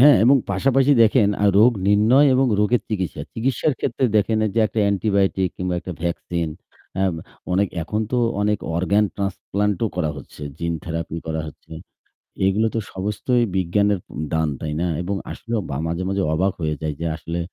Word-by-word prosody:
হ্যাঁ 145 +2 +9
এবং 135 +4 +6
পাশাপাশি 135 +7 +3
দেখেন 110 -1 +4
আ - - +4
রোগ 120 +4 +6 0.2
নির্ণয় 110 +8 +5
এবং 130 +1 +3
রোগের 115 +3 +2
চিকিৎসা। 95 -6 -3
চিকিৎসার 130 +5 0
ক্ষেত্রে 130 +1 -1
দেখেন 110 +1 +2 0.2
যে - - +1
একটা 110 - -5
অ্যান্টিবায়োটিক 100 -2 +1
কিংবা 90 -1 -2
একটা 90 - -6
ভ্যাকসিন, 85 -1 -2 0.5
হ্যাঁ, 95 0 +2
ব - - -6 0.4
অনেক 100 +2 +2
এখন 105 +7 -2
তো - - +2 0.3
অনেক 105 0 +1 0.2
অর্গান 100 +4 +2
ট্রান্সপ্লান্টও 100 +1 -1
করা 80 -4 0
হচ্ছে, 70 +2 -11 0.2
জিন 85 0 -1
থেরাপি 85 0 -4
করা 80 0 -2
হচ্ছে। 75 - -13 0.7
এগুলো 105 +3 +2
তো - - +1
সমস্তই 105 +6 0
বিজ্ঞানের 100 +3 +2 0.4
দান, 80 -1 +1
তাই 75 -1 -3
না? 90 - +1 0.2
এবং 100 +3 -2 0.2
আসলে 115 - -9 0.2
বা 70 - -2
মাঝে, 85 +2 -2
মাঝে, 95 0 0
অবাক 95 +4 +1
হয়ে 75 -1 0
যাই 80 -1 -1
যে 85 - -1
আসলে 85 +2 -5
100 Hz, 170 wpm, -22 LUFS, 85-110 Hz, 0.7 s, হ্যাঁ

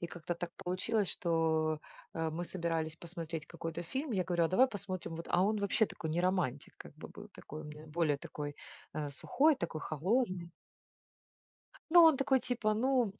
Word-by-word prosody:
и 170 - -3
как-то 175 0 -4
так 170 0 -5
получилось, 195 +3 0
что, 160 -2 +1 0.3
э, 165 -1 0
мы 170 +3 -3
собирались 165 -3 -2
посмотреть 165 -2 -6
какой-то 165 0 -5
фильм, 265 - -3
я 185 -3 +1
говорю: 175 -2 +2
"А - - +2
давай 245 +9 +5
посмотрим 185 -6 -5
вот". 165 - -6
А 180 - +4
он 215 +2 +2
вообще 200 +2 +2
такой 160 - -5
не 170 +3 +1
романтик, 180 -8 0
как - - -12
бы - - -9
был, 210 +1 -11
такой 155 +1 -8
у - - -11
меня 150 +1 -9
более 155 -2 +1
такой, 145 0 -6 0.4
э, 150 -2 -2
сухой, 280 - +3
такой 165 -2 -3
холодный. 185 - 0 1.4
Ну, 345 -1 +10
он 320 -3 +7
такой 265 0 +3
типа: 230 -4 0
"Ну, 245 -2 +2
175 Hz, 180 wpm, -33 LUFS, 160-205 Hz, 1.4 s, Ну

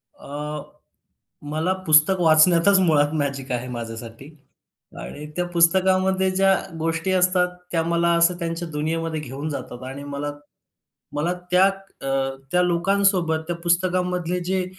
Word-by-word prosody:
अ, 150 +1 -6 0.9
मला 160 +5 0
पुस्तक 155 +4 +5
वाचण्यातच 170 +4 +5
मुळात 150 -4 +3
मॅजिक 140 -3 -3
आहे 125 +1 -3
माझ्यासाठी 115 +2 -7 0.7
आणि 150 - -8
त्या 180 0 -1
पुस्तकामध्ये 190 +2 +3
ज्या 195 0 +3 0.2
गोष्टी 165 +3 -1
असतात, 180 0 +3 0.2
त्या 165 -2 +1
मला 170 0 +1
असं 170 +1 +3
त्यांच्या 170 0 -3
दुनियेमध्ये 160 +1 -2
घेऊन 145 +2 -6
जातात. 130 -3 -7
आणि 135 +2 -7
मला 145 +1 -4 0.8
मला 165 +5 0 0.2
त्या 180 +1 +6 0.4
अ, 135 - -5 0.4
त्या 180 0 +3
लोकांसोबत, 180 -1 +2
त्या 175 - -2
पुस्तकांमधले 180 0 0
जे 185 0 0
165 Hz, 125 wpm, -23 LUFS, 150-180 Hz, 0.9 s, त्या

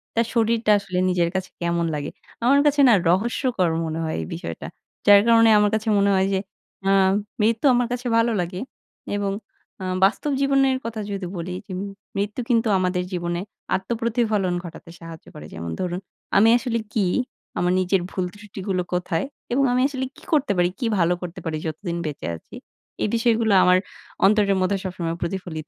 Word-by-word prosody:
তার 230 - +3
শরীরটা 225 -1 +2
আসলে 190 -2 -5
নিজের 175 -2 +1
কাছে 190 0 -2
কেমন 170 0 0
লাগে? 145 -1 -3 0.3
আমার 275 +4 +5
কাছে 290 0 +4
না - - +7 0.2
রহস্যকর 205 0 +1 0.2
মনে 160 0 -3
হয় 160 - -2
এই - - -4
বিষয়টা। 85 0 -6 0.4
যার 205 0 +9
কারণে 230 -1 +6
আমার 210 0 +4
কাছে 220 +1 -3
মনে 200 0 +3
হয় 190 0 +2
যে 190 - +2 0.5
আ - - +4 0.5
মৃত্যু 225 +4 +1
আমার 245 -1 +2
কাছে 245 0 -3
ভালো 230 +1 +3
লাগে 180 +2 -4 0.5
এবং 200 -1 -1 0.5
আ 185 - -4 0.2
বাস্তব 225 +9 0
জীবনের 275 -1 +3
কথা 230 -1 -4
যদি 195 -2 -3
বলি 175 +2 -4
যে - - -10 0.5
মৃত্যু 205 +5 -2
কিন্তু 230 -2 +3
আমাদের 180 -1 0
জীবনে 175 -1 -2 0.4
আত্মপ্রতিফলন 220 -2 0
ঘটাতে 170 -1 -10
সাহায্য 165 -1 -10
করে। 75 - -9
যেমন 85 0 -5
ধরুন 180 0 -2 0.4
আমি 220 +3 +6
আসলে 235 -1 -2
কি, 210 -3 +2 0.5
আমার 180 +1 +2
নিজের 185 0 +1
ভুল 185 - -2
ত্রুষ্টিগুলো 200 -2 -4
কোথায় 180 -2 -1 0.3
এবং 270 +3 +2
আমি 250 - +2
আসলে 265 -2 -3
কি - - -16
করতে 295 -6 +3
পারি, 175 0 +3
কি 250 - -1
ভালো 170 +1 +3
করতে 180 -2 -6
পারি 160 -1 -2
যতদিন 170 +2 -4
বেঁচে 150 - -5
আছি, 80 - -13 0.5
এই - - +2
বিষয়গুলো 225 -2 +2
আমার 180 0 +5 0.5
অন্তরের 200 -1 +4
মধ্যে 195 +2 +1
সবসময় 175 -3 -3
প্রতিফলিত 170 -4 -4
195 Hz, 175 wpm, -23 LUFS, 175-230 Hz, 0.5 s, যার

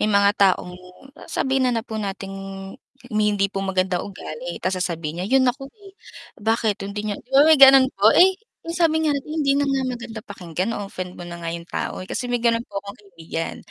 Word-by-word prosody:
may 210 - +2
mga 200 -1 +4
taong 185 -2 +3 0.6
sabihin 265 -1 +1
na 245 - 0
na 225 - -1
po 220 -3 -5
nating 195 -1 -5 0.8
may 215 0 +2
hindi 195 0 0
po 195 - -2
magandang 185 -2 0
ugali 175 -3 -7
ta's 185 0 0
sasabihin 170 -2 -3
niya, 185 - -2
"'Yun 265 0 +4
ako, 270 +1 -10
eh. 400 +2 -17 0.5
Bakit 220 -1 0
hindi 205 +1 -4
niya" 210 -1 -2
'Di 245 - -30
ba, 275 +2 +6
may 315 -2 +5
gano'n 270 -1 +9
po. 200 +2 +4
Eh, 375 +2 +7 0.4
sabi 320 -2 +2
nga 300 - +2
natin, 280 +1 -4 0.2
"Hindi 275 - +4
na - - +2
nga 270 -1 +1
maganda 235 -2 -7
pakinggan, 185 +1 -4
na-o-offend 185 -3 -6
mo - - -6
na 170 - -7
nga 165 -1 -5
'yong 170 0 -7
tao, - - -3
eh." 185 - -9
Kasi 245 0 -3
may 245 - +1
gano'n 230 0 +1
po 200 -3 -5
akong 200 0 -10
kaibigan, 170 -5 -6
205 Hz, 215 wpm, -22 LUFS, 185-260 Hz, 0.8 s, gano'n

